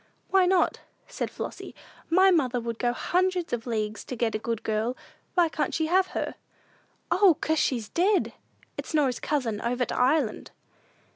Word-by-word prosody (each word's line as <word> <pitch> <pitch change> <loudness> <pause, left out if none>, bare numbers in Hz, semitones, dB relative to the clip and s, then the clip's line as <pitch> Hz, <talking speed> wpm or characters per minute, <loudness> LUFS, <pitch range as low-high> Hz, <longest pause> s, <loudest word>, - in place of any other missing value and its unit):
"Why 380 -2 +5
not?" 370 -1 +2 0.3
said - - -4
Flossy; - - -7 0.3
"my 375 +3 +5
mother 260 -8 +2
would 230 -1 -5
go 240 - +1
hundreds 360 +5 0
of 240 0 -3
leagues 215 -2 -2
to 255 - -5
get 230 -1 0
a 215 - -1
good 230 0 -3
girl. 220 +3 -1 0.4
Why 350 -2 +5
can't 310 -1 -2
she 320 - +1
have 370 +3 +3
her?" - - -2 0.8
"O, 370 -5 +5
'cause, 315 0 +1
she's 235 -5 0
dead! 380 - +1 0.5
It's - - -4
Norah's 270 -5 +2
cousin 235 -8 -1
over 245 +1 0
to - - -5
Ireland." 255 -2 +1
265 Hz, 165 wpm, -27 LUFS, 235-350 Hz, 0.8 s, Why